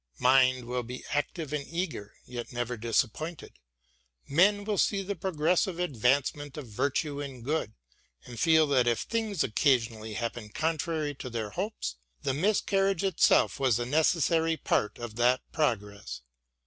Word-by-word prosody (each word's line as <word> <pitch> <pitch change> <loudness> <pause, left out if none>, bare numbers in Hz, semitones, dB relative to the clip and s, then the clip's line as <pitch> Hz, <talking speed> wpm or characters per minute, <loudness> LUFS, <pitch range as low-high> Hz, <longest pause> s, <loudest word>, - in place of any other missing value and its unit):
Mind 130 -1 +4
will 125 +1 -2
be 125 +2 -8
active 150 +1 -2
and 150 -2 -1
eager, 165 - -4
yet 120 -1 -7
never 120 0 -2
disappointed. 120 +8 -2 0.7
Men 205 +7 +4
will 205 -1 -1
see 200 -1 +2
the 200 +1 -3
progressive 175 +1 0
advancement 140 -1 0
of 150 - -6
virtue 140 +6 -1
and 135 -4 -7
good 150 -6 -1 0.5
and 120 -2 -9
feel 160 +1 +5
that 130 -4 +2
if 120 -1 +2
things 220 -4 -1
occasoni 120 +1 +2
ally 110 0 -7
happen 115 -1 -4
contrary 155 +2 -1
to 130 -2 -7
their 110 -3 -4
hopes, 190 - -4 0.3
the - - 0
miscarriage 195 +2 +1
itseH 190 -5 +3
was 130 -5 +3
a 120 - -2
necessary 160 +3 +2
part 105 - 0
of 120 -2 -7
that 125 +2 +3
progress. 105 - -2
140 Hz, 150 wpm, -29 LUFS, 120-165 Hz, 0.7 s, feel